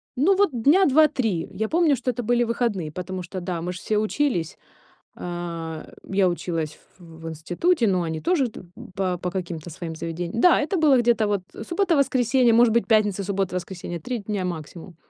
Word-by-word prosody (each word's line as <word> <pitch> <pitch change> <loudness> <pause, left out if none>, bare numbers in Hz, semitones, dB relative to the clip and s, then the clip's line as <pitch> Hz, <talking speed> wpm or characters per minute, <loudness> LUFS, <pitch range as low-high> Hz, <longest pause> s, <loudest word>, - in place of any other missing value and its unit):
Ну 350 +10 +3
вот 405 -1 +3
дня 290 +11 +4
2-3. 260 - +2
Я 220 +3 -2
помню, 325 -4 +3
что 250 - -2
это 245 0 -5
были 240 +2 +2
выходные, 225 -9 -1
потому 185 +2 -5
что 185 +1 -6
да, 175 -2 -3
мы 180 +2 -3
же 180 - -8
все 215 - -1
учились. 215 - -1 0.6
А, 170 -2 -6 0.2
я 195 -1 +2
училась 165 -3 -3 0.2
в 180 - -18 0.2
в 165 - -5
институте, 220 - 0
но 185 -2 +1
они 160 -1 -3
тоже 325 -8 +1
т - - -11 0.3
по 185 -2 -1
по 180 0 -3
каким-то 175 -3 -5
своим 165 +1 -6
заведениям. 170 +7 -4
Да, 360 - +6
это 305 +6 -1
было 290 -5 +5
где-то 235 -2 +2
вот, 205 -3 0
э, 220 - -8
суббота, 345 -2 +1
воскресенье, 255 -3 +3
может 235 0 +5
быть, 235 +1 +2
пятница, 205 -3 +2
суббота, 195 -1 -2
воскресенье, 175 -1 -6
3 245 +8 -3
дня 200 -2 -3
максимум. 170 +1 -7
200 Hz, 190 wpm, -24 LUFS, 175-245 Hz, 0.6 s, Да